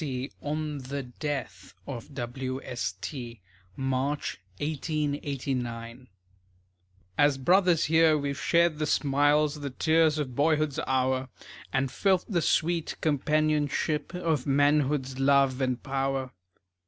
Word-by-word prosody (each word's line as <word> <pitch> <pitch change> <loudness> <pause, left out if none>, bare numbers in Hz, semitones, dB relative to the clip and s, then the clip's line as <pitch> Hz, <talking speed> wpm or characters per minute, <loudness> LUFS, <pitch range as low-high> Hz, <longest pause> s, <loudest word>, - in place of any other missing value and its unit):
T., 130 -1 -4
on 150 0 -3
the 135 +1 -5
death 140 +3 -5
of 125 -1 -7
W. 130 +1 -4
S. 95 -7 -3
T., 120 0 -6 0.4
March, 135 +2 -2 0.2
1889._) 135 -5 -3 1.1
As 145 -1 +4
brothers 175 +3 +3
here 160 0 +4
we've 140 -1 -2
shared 170 -2 +3
the 155 - 0
smiles, 145 +1 +2
The 145 -1 -4
tears 160 +3 +3
of 140 -4 -3
boyhood's 155 0 +2
hour, 130 0 +1 0.4
And 135 -1 0
felt 190 -3 +2
the 180 -6 0
sweet 165 +1 +1
companionship 150 +1 0
Of 160 -7 -1
manhood's 140 -1 +2
love 135 -1 +3
and 130 -1 -1
power. 135 -1 -1
140 Hz, 115 wpm, -28 LUFS, 130-155 Hz, 1.1 s, As